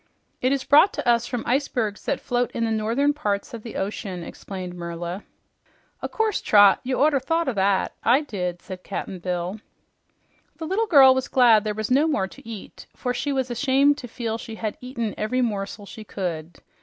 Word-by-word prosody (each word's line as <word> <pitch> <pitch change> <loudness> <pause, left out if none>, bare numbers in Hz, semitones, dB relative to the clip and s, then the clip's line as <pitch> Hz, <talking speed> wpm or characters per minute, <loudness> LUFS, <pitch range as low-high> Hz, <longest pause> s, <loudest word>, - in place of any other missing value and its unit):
"It 255 - +2
is 275 -1 0
brought 300 +9 +5
to - - -4
us 235 0 +3
from 245 -3 -3
the - - -6
icebergs 245 -5 -1
that - - 0
float 245 0 -1
in 230 - -1
the 225 - -1
northern 230 +7 +1
parts 205 -9 -2
of 230 - -6
the 230 - -9
ocean," 190 -2 -4
explained 185 0 -7
Merla. 175 +2 -5 0.8
"O' - - -2
course, 440 -2 -1
Trot. 205 -2 +6
You 255 0 -1
orter 290 -1 +3
thought 325 +5 0
o' 265 - 0
that. 195 -1 +1
I 250 +5 +4
did," 180 - -4
said 185 -1 -8
Cap'n 190 -1 -5
Bill. 180 +3 -3 1.0
The 325 - -5
little 405 +7 0
girl 275 -7 +8
was 260 0 -2
glad 235 -5 +5
there 210 -1 -2
was 215 +2 -3
no 285 +5 +4
more 200 -12 0
to 205 - -15
eat, 215 -4 -9
for 250 - -2
she 285 +3 -2
was 260 -2 -1
ashamed 275 +3 +3
to 245 - -7
feel 230 -1 -4
she 225 0 -8
had 215 -1 -4
eaten 235 -4 -4
every 250 +4 0
morsel 205 -2 -3
she 220 +2 -10
could. 175 -5 -5
230 Hz, 200 wpm, -24 LUFS, 200-265 Hz, 1.0 s, girl